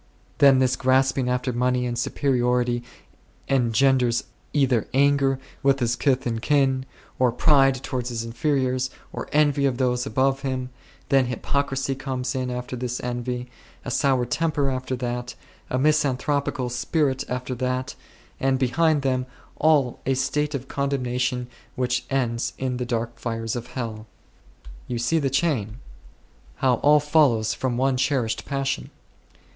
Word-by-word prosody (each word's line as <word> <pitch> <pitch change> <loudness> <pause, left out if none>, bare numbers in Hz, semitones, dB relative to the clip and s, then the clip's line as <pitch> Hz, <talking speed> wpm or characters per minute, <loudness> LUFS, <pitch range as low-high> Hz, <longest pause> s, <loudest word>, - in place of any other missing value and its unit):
Then 140 -2 +7
this 130 -1 +2
grasping 130 0 +2
after 125 0 -1
money 125 +1 +1
and 120 -1 -2
superiority 125 -1 +1 0.7
engenders 125 -1 +2 0.3
either 130 -6 +2
anger 140 -1 +3 0.2
with 135 -1 +3
his 120 -1 +1
kith 130 -1 +1
and 115 -2 -2
kin, 135 -1 +2 0.3
or 125 -2 +4
pride 135 +1 +4
towards 125 -2 -3
his 115 -2 -3
inferiors, 130 +1 0 0.2
or - - -6
envy 145 -2 +3
of 125 -3 -1
those 125 0 0
above 135 0 +1
him; 130 -2 -3 0.4
then 135 -2 +4
hypocrisy 135 +2 -1
comes 130 -1 -3
in 130 -1 -2
after 125 0 -4
this 125 0 -3
envy; 125 0 -4 0.3
a 125 - -3
soured 125 -2 +1
temper 150 -3 +1
after 130 0 -3
that; 125 0 -4 0.3
a 130 - 0
misan 145 -1 +2
thropical 135 -2 -1
spirit 135 +2 0
after 125 +1 -3
that; 125 +1 -2 0.5
and 135 0 +2
behind 145 +4 +2
them 130 -1 0 0.3
all 145 -5 +3
a 135 - +2
state 150 +3 0
of 135 -1 -5
condemnation 125 -3 -1 0.3
which 125 0 -1
ends 120 -3 -1
in 130 -1 -2
the 125 - -2
dark 120 -1 -3
fires 115 -1 -3
of 120 -1 -5
hell. 110 -3 -5 0.8
You 120 - -3
see 120 +8 +1
the 140 -3 0
chain; 130 -7 0 0.8
how 130 -2 +2
all 150 +4 +5
follows 145 -7 +3
from 125 -2 -2
one 130 0 +2
cherished 130 -4 0
passion. 135 - -2
130 Hz, 145 wpm, -24 LUFS, 125-135 Hz, 0.8 s, Then